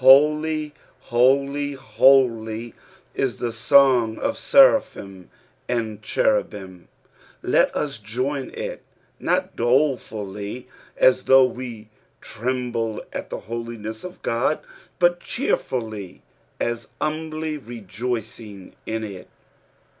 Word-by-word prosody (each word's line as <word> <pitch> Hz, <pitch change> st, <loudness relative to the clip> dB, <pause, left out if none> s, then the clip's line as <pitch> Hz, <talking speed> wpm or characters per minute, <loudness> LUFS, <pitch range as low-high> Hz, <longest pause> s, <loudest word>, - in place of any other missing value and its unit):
>■ -, -, -15 dB
Holy, 150 Hz, +3 st, +5 dB, 0.3 s
holy, 140 Hz, +4 st, +2 dB
holy 120 Hz, -3 st, +3 dB
I" -, -, -21 dB, 0.4 s
is 125 Hz, -6 st, -1 dB
the 120 Hz, -2 st, -3 dB
song 125 Hz, -2 st, +4 dB
of 280 Hz, 0 st, -1 dB
seraphim 100 Hz, -, +3 dB, 0.4 s
and 110 Hz, -3 st, -2 dB
cherubim; 100 Hz, -, -1 dB, 0.6 s
let -, -, +3 dB
us 140 Hz, -6 st, -2 dB
join 130 Hz, +6 st, -3 dB
it -, -, -5 dB, 0.2 s
— -, -, -38 dB
not -, -, +1 dB
dolefully, 120 Hz, -4 st, -1 dB, 0.3 s
as 130 Hz, 0 st, +4 dB
though 130 Hz, 0 st, +7 dB
we 120 Hz, -4 st, -6 dB, 0.3 s
trembled 120 Hz, -2 st, -3 dB
at -, -, -5 dB
the -, -, -5 dB
holiness 115 Hz, -1 st, -6 dB
of 180 Hz, 0 st, -9 dB
Ood, 125 Hz, +6 st, +1 dB, 0.4 s
but 175 Hz, 0 st, +3 dB
cheerfully, 110 Hz, -, -3 dB, 0.4 s
as 120 Hz, -1 st, -2 dB
humbly 155 Hz, 0 st, -3 dB
rejoicing 110 Hz, -3 st, -6 dB
in 110 Hz, 0 st, -2 dB
it. 100 Hz, -4 st, -8 dB
120 Hz, 105 wpm, -23 LUFS, 110-140 Hz, 0.6 s, though